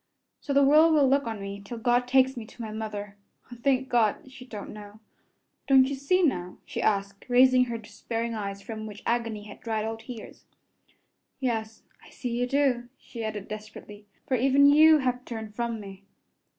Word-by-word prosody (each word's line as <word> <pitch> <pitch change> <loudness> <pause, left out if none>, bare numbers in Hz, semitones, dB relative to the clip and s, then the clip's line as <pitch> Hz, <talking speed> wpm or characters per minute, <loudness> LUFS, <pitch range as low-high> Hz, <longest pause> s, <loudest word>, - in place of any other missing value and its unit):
So 285 - -6
the 280 0 +5
world 310 +3 +6
will 285 -3 +5
look 275 0 +2
on 220 -2 -4
me 200 0 -6
till 235 +4 -7
God 245 +2 +1
takes 265 +1 +3
me 235 - -6
to 235 - -12
my 220 - -6
mother. 205 -2 -6 0.3
O, - - -7
thank 260 +2 +1
God! 240 +1 +1
She 260 -1 -12
don't 210 -5 -8
know. 210 0 -11 0.7
Don' 265 -1 +6
you 275 - -3
see, 280 +7 +1
now?" 180 - -1
she - - -4
asked, 200 -1 -1
raising 255 0 +5
her 235 -1 -4
despairing 225 +1 -5
eyes 200 -2 -5
from 220 -2 -6
which 210 -1 -10
agony 230 -3 -1
had 205 0 -12
dried 220 -2 -2
all 225 0 -3
tears. 225 -1 -10 0.9
"Yes, 225 -4 -3 0.2
I - - -16
see 245 - -5
you 245 +1 0
do," 250 -3 +1
she 230 -2 -8
added 215 -2 -4
desperately, 210 -1 -10 0.2
"for 260 - +1
even 270 +3 +4
you 310 +2 +7
have 250 -3 -1
turned 220 -4 -7
from 235 0 -3
me." 195 -1 -10
235 Hz, 190 wpm, -27 LUFS, 215-260 Hz, 0.9 s, you